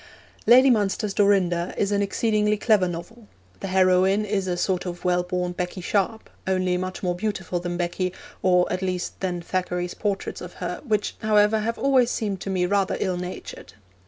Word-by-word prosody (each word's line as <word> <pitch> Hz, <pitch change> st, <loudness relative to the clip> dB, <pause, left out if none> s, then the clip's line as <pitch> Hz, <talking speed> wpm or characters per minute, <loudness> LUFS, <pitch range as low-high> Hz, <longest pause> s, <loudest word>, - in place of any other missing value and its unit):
Lady 255 Hz, +3 st, +7 dB
Munster's 210 Hz, -2 st, 0 dB
Dorinda 185 Hz, -4 st, +2 dB
is 200 Hz, 0 st, 0 dB
an 200 Hz, 0 st, +2 dB
exceedingly 210 Hz, +1 st, +1 dB
clever 205 Hz, -3 st, +3 dB
novel. 175 Hz, +7 st, -8 dB, 0.3 s
The 195 Hz, -, -4 dB
heroine 190 Hz, +2 st, +3 dB
is 195 Hz, -2 st, -1 dB
a 175 Hz, -1 st, -1 dB
sort 185 Hz, 0 st, -1 dB
of 175 Hz, 0 st, -7 dB
well 180 Hz, 0 st, +3 dB
born 180 Hz, 0 st, -2 dB
Becky 180 Hz, +1 st, -4 dB
Sharp, 205 Hz, +4 st, -1 dB, 0.2 s
only 185 Hz, -1 st, +1 dB
much 185 Hz, +1 st, -4 dB
more 180 Hz, -1 st, +1 dB
beautiful 190 Hz, -2 st, -2 dB
than 175 Hz, 0 st, -4 dB
Becky, 180 Hz, +1 st, -1 dB, 0.3 s
or 180 Hz, -1 st, +4 dB
at 185 Hz, -, -2 dB
least 185 Hz, -1 st, -3 dB
than 180 Hz, -2 st, -3 dB
Thackeray's 180 Hz, 0 st, -2 dB
portraits 200 Hz, -2 st, -3 dB
of -, -, -8 dB
her, -, -, -5 dB
which, 215 Hz, -6 st, -1 dB
however, 215 Hz, 0 st, +3 dB
have 230 Hz, +2 st, -2 dB
always 265 Hz, -3 st, +3 dB
seemed 205 Hz, -6 st, -2 dB
to -, -, -5 dB
me 185 Hz, -2 st, +1 dB
rather 195 Hz, 0 st, +1 dB
ill 185 Hz, -1 st, -1 dB
natured. 180 Hz, +1 st, -7 dB
190 Hz, 180 wpm, -24 LUFS, 180-210 Hz, 0.3 s, Lady